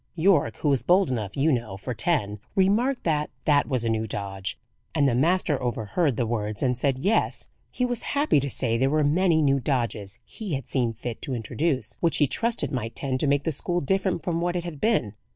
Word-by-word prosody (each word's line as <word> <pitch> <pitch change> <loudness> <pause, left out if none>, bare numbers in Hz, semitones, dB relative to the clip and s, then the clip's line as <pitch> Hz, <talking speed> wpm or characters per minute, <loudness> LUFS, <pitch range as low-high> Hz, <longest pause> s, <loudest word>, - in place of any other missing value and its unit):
Yorke, 165 -2 +3
who 150 - 0
is 130 - +1
bold 180 +4 +3
enough, 110 -4 -3
you 150 +4 +3
know, 115 -7 -2
for 125 +6 -5
ten, 105 -8 0 0.2
remarked 220 +8 +2
that 150 -3 0 0.2
that 145 -2 +3
was 125 -4 -1
a - - +1
new 110 0 0
dodge, 95 -4 -4 0.4
and 145 -3 +4
the 130 - +2
master 155 +2 +2
overheard 120 - 0
the 120 - +1
words, 110 -2 -2
and 125 -1 +2
said, 130 +1 0
Yes, 200 +11 0 0.2
he 250 - -1
was 245 -2 -1 0.2
happy 285 - +4
to 140 +1 -2
say 115 -3 0
there 135 +1 +3
were 155 +1 +2
many 160 +2 +3
new 140 -1 +3
'dodges' 120 -6 -2
he 200 -9 -5
had 135 - -6
seen 125 -4 0
fit 115 +1 -6
to 130 - -2
introduce, 135 +5 -2
which 165 -2 +1
he 150 - +4
trusted 230 - 0
might 115 -4 -3
tend 130 -2 -1
to 150 - +2
make 140 0 +2
the 165 - 0
school 175 +4 -1
different 185 +1 0
from 170 -1 -1
what 175 +1 -1
it 175 - -1
had 170 -5 -7
been. 210 - +1
140 Hz, 220 wpm, -25 LUFS, 120-170 Hz, 0.4 s, and